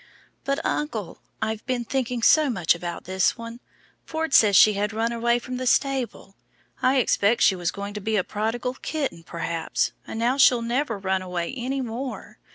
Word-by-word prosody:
"But, 275 +1 -1
uncle, 220 - -3 0.2
I've 220 0 -3
been 250 -2 -1
thinking 250 -2 -2
so 310 +2 +5
much 185 -9 +2
about 170 0 -6
this 190 +1 +1
one. 230 0 -8 0.4
Ford 320 -2 -3
says 205 -3 +6
she 215 +3 +7
had 205 +2 -2
run 225 +2 0
away 235 0 +1
from 250 +1 -6
the 255 0 -3
stable. 265 -6 0 0.5
I 260 +1 +3
expect 230 -2 +2
she 195 - +5
was 175 -2 -2
going 200 0 -6
to 210 - -6
be 220 +2 -1
a 185 - +2
prodigal 225 +5 -2
kitten, 280 - -3
perhaps, 165 0 -2 0.2
and - - -6
now 240 +4 +1
she'll 250 -4 +5
never 240 -1 -1
run 190 -1 -1
away 180 +2 -4
any 265 +2 -2
more. 250 +2 -6
230 Hz, 180 wpm, -24 LUFS, 200-255 Hz, 0.5 s, she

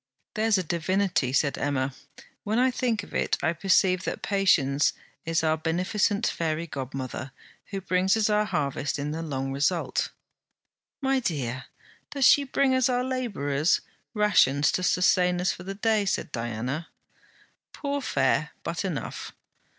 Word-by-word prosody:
'There's 220 -1 +2
a 185 - 0
divinity...' 175 -3 0
said 140 0 +1
Emma. 140 -2 -1 0.5
'When 215 +2 -1
I 255 +1 +4
think 235 -5 -1
of - - -13
it - - +1
I 165 - +2
perceive 185 +1 +2
that - - -4
Patience 160 -9 +3 0.3
is 165 -1 +1
our 160 0 +2
beneficent 185 +7 0
fairy 165 0 -1
godmother, 135 -2 -5 0.3
who 195 -1 -5
brings 185 +3 +2
us 220 - +2
our 210 0 +2
harvest 145 -7 -2
in 145 +1 -3
the 160 +2 -4
long 135 -4 -3
result.' 145 +6 0 0.9
'My 270 0 +2
dear, 135 - -3 0.4
does 280 -2 +1
she 285 - +6
bring 270 0 +2
us 260 0 +3
our 250 0 +1
labourers' 195 - 0 0.3
rations, 160 -9 +4
to - - -1
sustain 180 0 +3
us 180 +1 +1
for - - -8
the 195 +2 -6
day?' 215 0 +1
said 170 - -1
Diana.' 120 +7 -3 0.8
'Poor 285 -1 -3
fare, 155 - +1
but 165 +3 -3
enough.' 175 -8 -5
180 Hz, 150 wpm, -26 LUFS, 145-210 Hz, 0.9 s, she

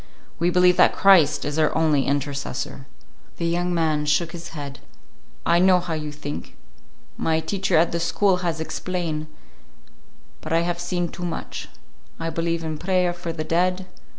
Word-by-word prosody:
We 170 +1 +2
believe 180 0 +4
that 180 - +5
Christ 170 -7 +5
is 145 +2 -2
our 155 - +3
only 155 -4 +2
intercessor." 140 -1 -3 0.5
The 170 - -2
young 175 +1 0
man 155 -3 +1
shook 155 +3 +2
his 170 -1 -8
head. 145 -3 -7 0.7
"I 170 0 +4
know 185 0 +5
how 175 -2 -4
you 150 -1 -3
think. 145 0 -7 0.6
My 160 0 +1
teacher 190 0 0
at 165 +1 +3
the 170 - -1
school 185 +3 +2
has 170 -3 -2
explain. 160 -1 -3 1.1
But - - -4
I 165 - +4
have 175 0 -2
seen 175 0 -1
too 180 - -8
much. 175 - -5 0.5
I 165 0 -2
believe 165 0 -1
in 155 -1 -4
prayer 180 0 +1
for 175 -1 -5
the 160 -1 -4
dead. 180 +3 +1
170 Hz, 165 wpm, -23 LUFS, 155-175 Hz, 1.1 s, that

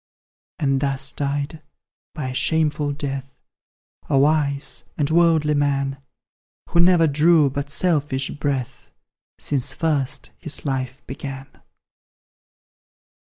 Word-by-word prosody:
And 135 -2 +1
thus 135 0 0
died, 145 +2 -3 0.5
by 140 -5 -3
a - - -5
shameful 150 0 +1
death, 135 -1 -5 0.7
A 140 - +3
wise 140 -1 +1
and 145 0 0
worldly 160 -2 +4
man, 140 -1 0 0.7
Who 170 - +2
never 175 -1 +6
drew 155 -1 +4
but 140 +1 -4
selfish 145 -4 0
breath 140 -4 -3 0.5
Since 140 -4 -1
first 145 -4 -1
his 155 - -4
life 130 -1 -3
began. 135 0 -7
145 Hz, 105 wpm, -22 LUFS, 135-155 Hz, 0.7 s, never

